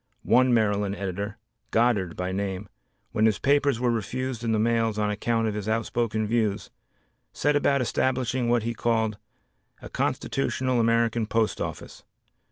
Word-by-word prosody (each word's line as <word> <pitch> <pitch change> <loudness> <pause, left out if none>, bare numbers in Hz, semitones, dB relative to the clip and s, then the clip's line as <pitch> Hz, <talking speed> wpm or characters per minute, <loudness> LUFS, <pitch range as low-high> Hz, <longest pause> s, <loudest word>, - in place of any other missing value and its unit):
One 130 0 +4
Maryland 105 -3 +1
editor, 100 +2 -4 0.3
Goddard 110 -7 +1
by 90 +1 -3
name, 95 +1 -3 0.4
when 110 +1 +3
his 110 - +1
papers 140 -3 +2
were 125 -1 +2
refused 120 +2 -3
in 115 - 0
the 110 - +2
mails 115 0 +1
on 105 -1 +1
account 115 +2 0
of 110 - -1
his 105 0 -4
outspoken 110 -1 0
views, 110 -2 -1 0.6
set 145 +1 +1
about 140 -1 +2
establishing 125 0 0
what 120 -2 +2
he 115 +1 -2
called 110 -3 0 0.6
"A - - -10
Constitutional 130 -2 -1
American 115 -1 +2
Post 115 -1 0
Office." - - -6
115 Hz, 150 wpm, -26 LUFS, 105-120 Hz, 0.6 s, One